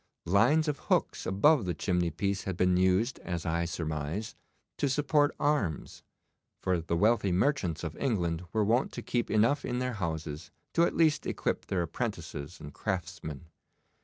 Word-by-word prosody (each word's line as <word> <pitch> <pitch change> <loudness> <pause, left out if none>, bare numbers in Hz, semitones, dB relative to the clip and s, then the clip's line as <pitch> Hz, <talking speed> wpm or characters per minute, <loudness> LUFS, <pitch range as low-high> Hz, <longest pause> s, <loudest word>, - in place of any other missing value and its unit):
Lines 120 - +4
of 150 -1 -1
hooks - - +1
above 120 +6 +4
the 90 -2 -1
chimneypiece 90 +3 -1
had 95 -3 -3
been 90 -1 +3
used, 95 +7 +2
as 85 -2 -4
I 85 0 0
surmise, 80 +5 -3 0.5
to 140 - +2
support 145 +2 +2
arms, 145 - -1 0.6
for 90 -2 0
the 85 +1 -1
wealthy 105 0 +3
merchants 90 - +1
of 80 -1 -4
England 90 -10 0
were 110 -2 +1
wont 120 +5 +2
to - - -6
keep 120 -1 -1
enough 115 +7 +3
in 125 - -2
their 125 0 -1
houses 80 -4 -4 0.2
to 170 - +4
at - - -2
least 160 -2 +3
equip - - -2
their 90 -3 0
apprentices 75 -1 -5
and 75 -1 -9
craftsmen. 80 -5 -4
95 Hz, 160 wpm, -30 LUFS, 85-125 Hz, 0.6 s, Lines